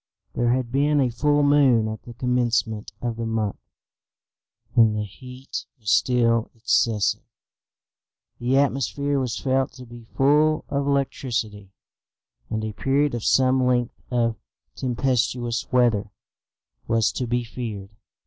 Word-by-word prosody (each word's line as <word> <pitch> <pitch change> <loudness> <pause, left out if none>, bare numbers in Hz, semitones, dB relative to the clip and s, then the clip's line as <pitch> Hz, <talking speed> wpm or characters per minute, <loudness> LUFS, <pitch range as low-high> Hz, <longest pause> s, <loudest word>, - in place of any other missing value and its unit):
There 120 0 +1
had 125 -1 -1
been 145 +2 +2
a 130 -3 +2
full 145 +4 +2
moon 135 -6 +4
at 110 0 -5
the 120 - -12
commencement 120 -3 0
of 120 -2 -2
the 115 - -3
month, 110 -3 -2 1.2
and 110 -3 +5
the 105 - -1
heat 125 +6 -8
was 105 -3 -2
still 115 -2 +2
excessive. 110 -2 +1 1.2
The 125 +3 +1
atmosphere 140 +1 0
was 125 -3 -2
felt 130 -1 0
to 125 0 -11
be 120 -1 -12
full 150 +3 +3
of 140 0 -1
electricity, 120 -7 -2 0.8
and 110 -1 -2
a 110 -1 -4
period 140 +4 +1
of 120 -2 -3
some 130 0 +3
length 125 -1 0
of 115 -2 0 0.4
tempestuous 125 -1 -1
weather 120 -5 +2 0.8
was 115 -1 +2
to 125 - -3
be 120 +1 0
feared. 110 -5 -6
120 Hz, 130 wpm, -24 LUFS, 115-135 Hz, 1.2 s, and